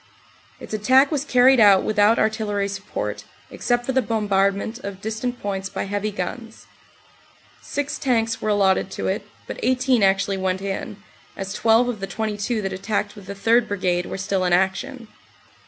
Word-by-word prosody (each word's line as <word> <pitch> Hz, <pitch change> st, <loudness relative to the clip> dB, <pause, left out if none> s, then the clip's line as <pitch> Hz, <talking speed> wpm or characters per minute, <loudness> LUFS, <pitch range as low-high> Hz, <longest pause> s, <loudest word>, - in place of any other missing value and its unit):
Its -, -, -10 dB
attack 260 Hz, +7 st, +4 dB
was 290 Hz, -3 st, 0 dB
carried 255 Hz, -2 st, +5 dB
out 200 Hz, -3 st, +6 dB
without 215 Hz, +1 st, +3 dB
artillery 215 Hz, -2 st, 0 dB
support, 200 Hz, 0 st, -5 dB, 0.3 s
except 245 Hz, 0 st, -1 dB
for 265 Hz, -, -1 dB
the 260 Hz, 0 st, +2 dB
bombardment 205 Hz, 0 st, 0 dB
of 200 Hz, -5 st, -7 dB
distant 220 Hz, +4 st, -4 dB
points 195 Hz, -1 st, -3 dB
by -, -, -4 dB
heavy 205 Hz, +1 st, -2 dB
guns. 220 Hz, +4 st, -6 dB, 1.0 s
Six 285 Hz, 0 st, -4 dB
tanks 230 Hz, -4 st, 0 dB
were 215 Hz, -, -1 dB
allotted 195 Hz, -2 st, +2 dB
to -, -, -4 dB
it, -, -, -2 dB, 0.2 s
but -, -, -7 dB
18 255 Hz, -2 st, +2 dB
actually 195 Hz, 0 st, +2 dB
went 190 Hz, 0 st, -1 dB
in, 195 Hz, +1 st, -5 dB, 0.4 s
as 195 Hz, 0 st, -5 dB
12 230 Hz, +2 st, +3 dB
of 240 Hz, -4 st, -3 dB
the 195 Hz, -, -4 dB
22 215 Hz, +2 st, -2 dB
that 195 Hz, 0 st, -3 dB
attacked 205 Hz, +2 st, -2 dB
with 200 Hz, -3 st, -13 dB
the 200 Hz, -, -6 dB
3rd 230 Hz, +3 st, +3 dB
Brigade 180 Hz, -3 st, -1 dB
were -, -, -5 dB
still 195 Hz, -1 st, -1 dB
in 180 Hz, -1 st, +1 dB
action. 225 Hz, +7 st, 0 dB
210 Hz, 170 wpm, -22 LUFS, 195-235 Hz, 1.0 s, out